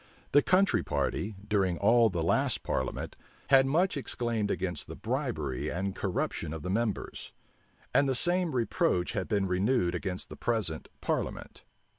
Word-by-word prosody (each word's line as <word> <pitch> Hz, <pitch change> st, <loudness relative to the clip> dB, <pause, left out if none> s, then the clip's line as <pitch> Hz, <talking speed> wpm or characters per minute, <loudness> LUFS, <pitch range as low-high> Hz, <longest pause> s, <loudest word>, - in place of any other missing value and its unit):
The 145 Hz, -, +6 dB
country 185 Hz, +4 st, +3 dB
party, 105 Hz, 0 st, -2 dB
during 95 Hz, -5 st, +1 dB
all 115 Hz, +2 st, +5 dB
the 85 Hz, -4 st, -2 dB
last 85 Hz, -, +1 dB
parliament, 65 Hz, -, -2 dB, 0.4 s
had 135 Hz, -1 st, +7 dB
much 170 Hz, +7 st, +2 dB
exclaimed 120 Hz, -6 st, -2 dB
against 90 Hz, -4 st, -3 dB
the -, -, -7 dB
bribery 70 Hz, -5 st, -2 dB
and 95 Hz, +2 st, -2 dB
corruption 90 Hz, -5 st, -2 dB
of 80 Hz, -, -6 dB
the 90 Hz, -, -2 dB
members; 110 Hz, 0 st, -2 dB, 0.6 s
and 140 Hz, -1 st, +4 dB
the 130 Hz, -, +1 dB
same 175 Hz, +1 st, +1 dB
reproach 120 Hz, -, +1 dB
had -, -, -2 dB
been 100 Hz, -2 st, +1 dB
renewed 95 Hz, 0 st, +1 dB
against 90 Hz, 0 st, -4 dB
the -, -, -8 dB
present 110 Hz, -9 st, -1 dB
parliament. -, -, -3 dB
105 Hz, 150 wpm, -30 LUFS, 90-130 Hz, 0.6 s, had